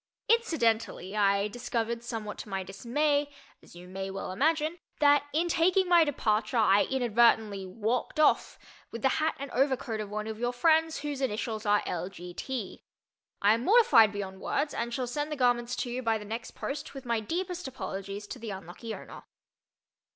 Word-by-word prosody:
Incidentally, 230 Hz, -, +1 dB
I 200 Hz, -1 st, +3 dB
discovered, 235 Hz, 0 st, -3 dB
somewhat 225 Hz, -3 st, -5 dB
to -, -, -8 dB
my 195 Hz, -1 st, -2 dB
dismay, 285 Hz, +9 st, 0 dB, 0.3 s
as -, -, -17 dB
you 175 Hz, +1 st, -11 dB
may 190 Hz, +1 st, -5 dB
well 195 Hz, -1 st, -5 dB
imagine, 315 Hz, -, +1 dB, 0.2 s
that 290 Hz, -1 st, +5 dB
in 330 Hz, +4 st, +1 dB
taking 360 Hz, +3 st, +3 dB
my 345 Hz, -2 st, +6 dB
departure 220 Hz, -6 st, 0 dB
I 205 Hz, -2 st, +5 dB
inadvertently 225 Hz, -5 st, +2 dB
"walked 230 Hz, -, -2 dB
off" 310 Hz, -, +3 dB, 0.3 s
with 230 Hz, -, -8 dB
the 265 Hz, -, +5 dB
hat 315 Hz, +1 st, +1 dB
and 280 Hz, -1 st, -6 dB
overcoat 255 Hz, -4 st, 0 dB
of 210 Hz, -, -6 dB
one 210 Hz, +1 st, -3 dB
of 220 Hz, 0 st, -6 dB
your 245 Hz, +1 st, -1 dB
friends 320 Hz, +4 st, +2 dB
whose 290 Hz, -2 st, -4 dB
initials 220 Hz, -3 st, -2 dB
are 205 Hz, 0 st, +3 dB
L. 180 Hz, +1 st, -3 dB
G. 180 Hz, -2 st, -10 dB
T. 240 Hz, 0 st, -5 dB, 0.6 s
I 205 Hz, +1 st, +6 dB
am 230 Hz, +2 st, -1 dB
mortified 390 Hz, -, +6 dB
beyond 195 Hz, -2 st, -6 dB
words 295 Hz, -, -1 dB
and 235 Hz, +1 st, -3 dB
shall 255 Hz, +1 st, -2 dB
send 295 Hz, +5 st, -3 dB
the -, -, -1 dB
garments 245 Hz, -2 st, +1 dB
to 245 Hz, -, -3 dB
you 250 Hz, +1 st, -3 dB
by 225 Hz, -2 st, +1 dB
the 210 Hz, -, -9 dB
next 225 Hz, +3 st, -6 dB
post 285 Hz, +1 st, -5 dB
with 270 Hz, -1 st, -8 dB
my 235 Hz, -2 st, +1 dB
deepest 350 Hz, -, -3 dB
apologies 200 Hz, -4 st, -6 dB
to 250 Hz, -, -8 dB
the 230 Hz, -1 st, -6 dB
unlucky 195 Hz, +4 st, -7 dB
owner. -, -, -10 dB
235 Hz, 180 wpm, -29 LUFS, 210-290 Hz, 0.6 s, my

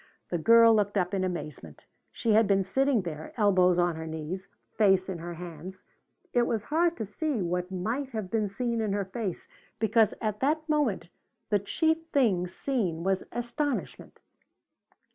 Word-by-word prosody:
The 175 Hz, -, 0 dB
girl 230 Hz, +5 st, +7 dB
looked 205 Hz, -1 st, +1 dB
up 180 Hz, -1 st, 0 dB
in 190 Hz, -1 st, 0 dB
amazement. 150 Hz, -, -6 dB, 0.3 s
She 225 Hz, -, 0 dB
had 220 Hz, 0 st, +5 dB
been 195 Hz, -1 st, +3 dB
sitting 265 Hz, +3 st, +1 dB
there, 155 Hz, -3 st, -7 dB
elbows 185 Hz, -4 st, +4 dB
on 175 Hz, -1 st, +2 dB
her 160 Hz, 0 st, -6 dB
knees, 160 Hz, +4 st, -5 dB, 0.3 s
face 190 Hz, -3 st, +3 dB
in 185 Hz, -3 st, -4 dB
her 170 Hz, +1 st, -6 dB
hands. 175 Hz, +2 st, -9 dB, 0.5 s
It 240 Hz, -1 st, +3 dB
was 220 Hz, -3 st, -1 dB
hard 335 Hz, +5 st, +1 dB
to 220 Hz, -, -3 dB
see 270 Hz, +6 st, -2 dB
what 180 Hz, 0 st, -2 dB
might 225 Hz, +9 st, -3 dB
have 215 Hz, -7 st, -5 dB
been 215 Hz, -2 st, +1 dB
seen 230 Hz, +3 st, -2 dB
in 210 Hz, -2 st, -1 dB
her 200 Hz, -1 st, -1 dB
face 190 Hz, -1 st, -5 dB, 0.3 s
because 220 Hz, 0 st, +3 dB
at 215 Hz, -2 st, -2 dB
that 310 Hz, +3 st, 0 dB
moment 290 Hz, -, 0 dB, 0.4 s
the 205 Hz, -, +4 dB
chief 320 Hz, -, +1 dB
thing 215 Hz, -, +2 dB
seen 185 Hz, -, -2 dB
was 190 Hz, 0 st, 0 dB
astonishment. 240 Hz, +4 st, -4 dB
205 Hz, 165 wpm, -28 LUFS, 180-235 Hz, 0.5 s, girl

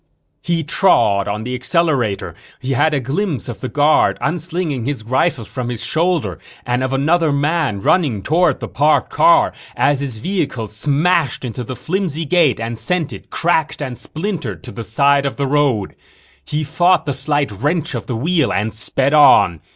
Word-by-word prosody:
_ -, -, -48 dB, 0.4 s
He 170 Hz, -2 st, -1 dB
trod 105 Hz, -, +2 dB
on 105 Hz, +1 st, -3 dB
the 125 Hz, +2 st, -4 dB
accelerator. 130 Hz, -, 0 dB, 0.3 s
He 130 Hz, -, -4 dB
had 135 Hz, +5 st, +2 dB
a 150 Hz, -, 0 dB
glimpse 145 Hz, -, -2 dB
of 120 Hz, -, -7 dB
the 130 Hz, -, -4 dB
guard 150 Hz, +1 st, +3 dB
unslinging 160 Hz, -4 st, -2 dB
his 140 Hz, -6 st, -3 dB
rifle 130 Hz, +1 st, 0 dB
from 120 Hz, +5 st, -5 dB
his 120 Hz, -1 st, -4 dB
shoulder 160 Hz, -, 0 dB, 0.3 s
and 125 Hz, +1 st, 0 dB
of 130 Hz, -, -1 dB
another 155 Hz, +4 st, +2 dB
man 140 Hz, -6 st, 0 dB
running 130 Hz, -, +1 dB
toward 165 Hz, -2 st, +1 dB
the -, -, -4 dB
parked 150 Hz, +2 st, +1 dB
car 335 Hz, 0 st, +4 dB, 0.2 s
as 145 Hz, -2 st, +2 dB
his 135 Hz, -5 st, -4 dB
vehicle 140 Hz, -, -2 dB
smashed 145 Hz, -, 0 dB
into 125 Hz, +1 st, -5 dB
the 130 Hz, +3 st, -6 dB
flimsy 165 Hz, -2 st, -2 dB
gate 155 Hz, -7 st, +2 dB
and 115 Hz, 0 st, -4 dB
sent 180 Hz, -5 st, -1 dB
it, -, -, -11 dB
cracked 160 Hz, -2 st, 0 dB
and 130 Hz, -4 st, -4 dB
splintered, 155 Hz, -, -5 dB
to -, -, -9 dB
the 115 Hz, -, -7 dB
side 140 Hz, +5 st, +2 dB
of 140 Hz, -, -4 dB
the 140 Hz, -, -1 dB
road. 135 Hz, -7 st, +1 dB, 0.5 s
He 150 Hz, +1 st, -3 dB
fought 175 Hz, +4 st, +2 dB
the 140 Hz, -, -1 dB
slight 145 Hz, 0 st, -1 dB
wrench 145 Hz, -, -2 dB
of 120 Hz, -, -5 dB
the 125 Hz, -, -3 dB
wheel 155 Hz, +4 st, +1 dB
and 105 Hz, +2 st, -1 dB
sped 130 Hz, +5 st, 0 dB
on. 95 Hz, -, +5 dB
140 Hz, 180 wpm, -18 LUFS, 120-165 Hz, 0.5 s, on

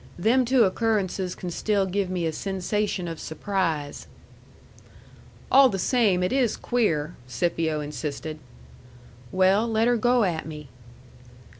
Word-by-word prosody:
Them 235 Hz, +8 st, +3 dB
two 250 Hz, 0 st, +4 dB
occurrences 195 Hz, -3 st, 0 dB
can 180 Hz, -2 st, -6 dB
still 200 Hz, +2 st, 0 dB
give 190 Hz, 0 st, -1 dB
me 180 Hz, -2 st, -2 dB
a 160 Hz, -, 0 dB
sensation 195 Hz, +1 st, -2 dB
of 165 Hz, -1 st, -6 dB
surprise." 160 Hz, -5 st, -3 dB, 1.4 s
"All 270 Hz, 0 st, +7 dB
the 195 Hz, -, -2 dB
same 195 Hz, -3 st, +2 dB
it 180 Hz, -, 0 dB
is 260 Hz, -4 st, +1 dB
queer," 170 Hz, -10 st, 0 dB
Scipio 160 Hz, +4 st, -1 dB
insisted 150 Hz, +2 st, -5 dB, 0.9 s
"Well, 190 Hz, +4 st, +3 dB
let 225 Hz, 0 st, +1 dB
her 245 Hz, 0 st, +3 dB
go 245 Hz, +1 st, +3 dB
at 165 Hz, -5 st, -1 dB
me." 150 Hz, -3 st, -9 dB
190 Hz, 130 wpm, -25 LUFS, 165-220 Hz, 1.4 s, All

